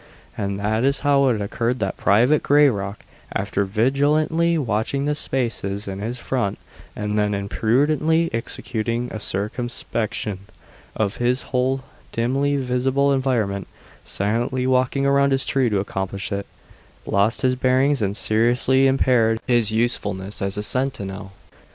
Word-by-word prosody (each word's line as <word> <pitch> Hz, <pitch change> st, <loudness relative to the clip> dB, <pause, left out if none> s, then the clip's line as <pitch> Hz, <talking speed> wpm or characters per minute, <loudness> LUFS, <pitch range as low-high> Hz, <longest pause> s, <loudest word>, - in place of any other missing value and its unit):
And 100 Hz, -1 st, -3 dB
that 110 Hz, +3 st, 0 dB
is 140 Hz, +1 st, +2 dB
how 140 Hz, -1 st, +3 dB
it 120 Hz, -4 st, +1 dB
occurred 115 Hz, +4 st, -1 dB
that 95 Hz, -5 st, -2 dB
Private 125 Hz, +9 st, +3 dB
Grayrock, 110 Hz, -9 st, +2 dB, 0.3 s
after 100 Hz, +1 st, -1 dB
vigilantly 145 Hz, -, +2 dB
watching 125 Hz, +1 st, -1 dB
the 150 Hz, -, +1 dB
spaces 115 Hz, -8 st, -2 dB
in 95 Hz, 0 st, -5 dB
his 115 Hz, +4 st, -4 dB
front 115 Hz, -5 st, -2 dB, 0.4 s
and 105 Hz, 0 st, -2 dB
then 105 Hz, 0 st, +1 dB
imprudently 145 Hz, +11 st, +1 dB
executing 115 Hz, +1 st, -3 dB
a 110 Hz, -, -4 dB
circumspection 110 Hz, 0 st, -3 dB, 0.6 s
of 110 Hz, -1 st, -1 dB
his 125 Hz, +2 st, 0 dB
whole 130 Hz, +1 st, +1 dB, 0.3 s
dimly 135 Hz, +5 st, 0 dB
visible 135 Hz, +2 st, +1 dB
environment 115 Hz, -8 st, 0 dB, 0.4 s
(silently 120 Hz, +6 st, -1 dB
walking 130 Hz, +1 st, +1 dB
around 140 Hz, 0 st, +3 dB
his 135 Hz, -, +1 dB
tree 130 Hz, -3 st, +1 dB
to 105 Hz, -2 st, +1 dB
accomplish 95 Hz, 0 st, -4 dB
it) 100 Hz, 0 st, -3 dB, 0.6 s
lost 100 Hz, +4 st, +1 dB
his 130 Hz, 0 st, +3 dB
bearings 130 Hz, +1 st, +2 dB
and 100 Hz, 0 st, -1 dB
seriously 125 Hz, +4 st, +3 dB
impaired 125 Hz, -4 st, +2 dB
his 120 Hz, -4 st, +3 dB
usefulness 105 Hz, -4 st, -1 dB
as 100 Hz, 0 st, -1 dB
a 105 Hz, -, -1 dB
sentinel. 100 Hz, -6 st, -2 dB
120 Hz, 130 wpm, -22 LUFS, 105-135 Hz, 0.6 s, how